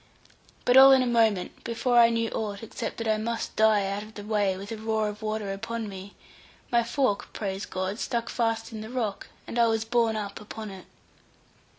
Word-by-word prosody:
But 245 +1 +5
all 270 +1 +10
in 260 -1 +5
a - - 0
moment, 225 -6 +1
before 240 +1 +2
I 230 -1 +7
knew 230 -1 -1
aught, 205 -1 -4
except 225 - -5
that 230 - -3
I 215 0 +2
must 230 +1 -3
die 215 -2 +4
out 200 +1 -2
of 215 +1 -12
the 205 - -7
way, 205 -3 0
with 200 +3 -8
a 225 - -4
roar 220 0 0
of 210 +1 -9
water 215 -2 -2
upon 225 +2 -4
me, 195 0 -9 0.6
my 235 -1 +4
fork, 235 -3 0
praise 195 -1 -4
God 185 +3 -3
stuck 235 -1 -2
fast 225 -2 -1
in 220 -1 -6
the 220 - -7
rock, 230 -6 -3 0.2
and 240 - -3
I 235 - +5
was 225 0 0
borne 230 -1 +2
up 205 -2 -5
upon 215 0 -7
it. 190 -1 -11
220 Hz, 210 wpm, -27 LUFS, 205-230 Hz, 0.6 s, all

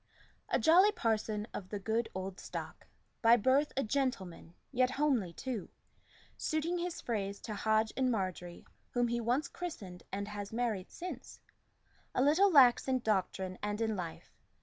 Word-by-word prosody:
A - - +3
jolly 360 +6 +6
parson 215 - -1
of 185 -2 -6
the 210 - -3
good 220 +3 -1
old 190 0 -5
stock, - - -7 0.3
By 230 +1 +7
birth 265 +6 +3
a 270 - +2
gentleman, 210 -10 -2 0.2
yet 255 -1 +3
homely 255 - +1
too, 225 +2 -5 0.7
Suiting 325 +3 -1
his 350 0 -3
phrase 200 -4 -3
to 220 - -5
Hodge 220 +1 +1
and 260 -1 +2
Margery 185 -5 -3 0.3
Whom 245 -1 +2
he 235 0 0
once 250 +6 +1
christened, 200 - -7
and 200 +1 -3
has 205 -1 -6
married 225 -5 -2
since, 335 -8 -8 0.8
A 255 - +3
little 345 +8 +5
lax 260 -6 +6
in 260 -1 +2
doctrine 190 -3 -1
and 210 0 -2
in 220 -1 0
life. 175 -4 -7
225 Hz, 155 wpm, -33 LUFS, 200-265 Hz, 0.8 s, By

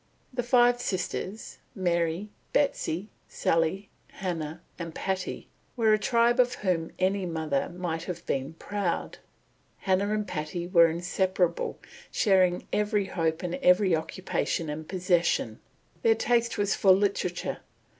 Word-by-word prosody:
The 250 - 0
five 245 0 +4
sisters, 190 +2 -4 0.2
Mary, 175 +1 0 0.2
Betsy, 210 - 0 0.2
Sally, 165 +5 0 0.3
Hannah, 165 -5 -4 0.2
and 165 -2 -6
Patty, 190 -1 -3 0.3
were 220 -2 +4
a 215 - +3
tribe 235 +2 +3
of 245 0 +4
whom 175 -5 -1
any 190 0 +1
mother 160 -4 -1
might 175 -2 -4
have 180 -2 -6
been 135 +3 -2
proud. 200 -1 -3 0.6
Hannah 195 +2 +1
and 210 -1 -1
Patty 155 +2 -4
were 170 -2 +6
inseparable, 180 +1 0 0.3
sharing 185 -4 +3
every 210 -1 +1
hope 165 -3 -1
and 175 -1 -2
every 180 0 +5
occupation 160 -1 -2
and 155 +1 -7
possession. 180 -2 +1 0.4
Their 455 -1 +4
taste 235 - +1
was 205 -1 +1
for 195 - +2
literature. 190 -2 -1
185 Hz, 125 wpm, -28 LUFS, 170-205 Hz, 0.6 s, were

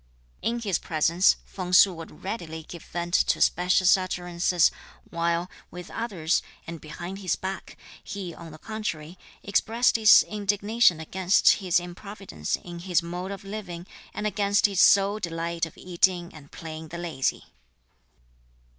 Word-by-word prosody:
In 235 +1 -1
his 200 -6 0
presence, 165 +3 +3
Feng 180 -2 -6
Su 190 +1 +7
would 165 -1 -11
readily 165 -6 -5
give 170 +1 -10
vent 175 0 -5
to - - +3
specious 180 +2 +4
utterances, 175 -2 +1 0.4
while, 170 +1 0 0.2
with 180 0 -10
others, 190 -8 -1 0.2
and 170 -1 -8
behind 175 +5 -7
his 185 -4 0
back, 190 0 -6 0.3
he 190 -4 -6
on 165 -1 -11
the 155 - -11
contrary 180 -5 -5 0.2
expressed 225 +5 +2
his 220 -1 +7
indignation 205 -2 +1
against 185 +4 +3
his 180 -2 +2
improvidence 175 - -5
in 175 -1 -9
his 180 -1 0
mode 180 +2 -5
of 200 0 -7
living, 195 -4 -7 0.3
and 210 - -5
against 205 -1 +2
his 195 -3 +2
sole 200 +1 +5
delight 165 -1 -3
of 165 - -16
eating 180 0 0
and 145 -2 -14
playing 160 -1 -8
the 170 - -8
lazy. 165 -6 -2
180 Hz, 145 wpm, -26 LUFS, 170-200 Hz, 0.4 s, Su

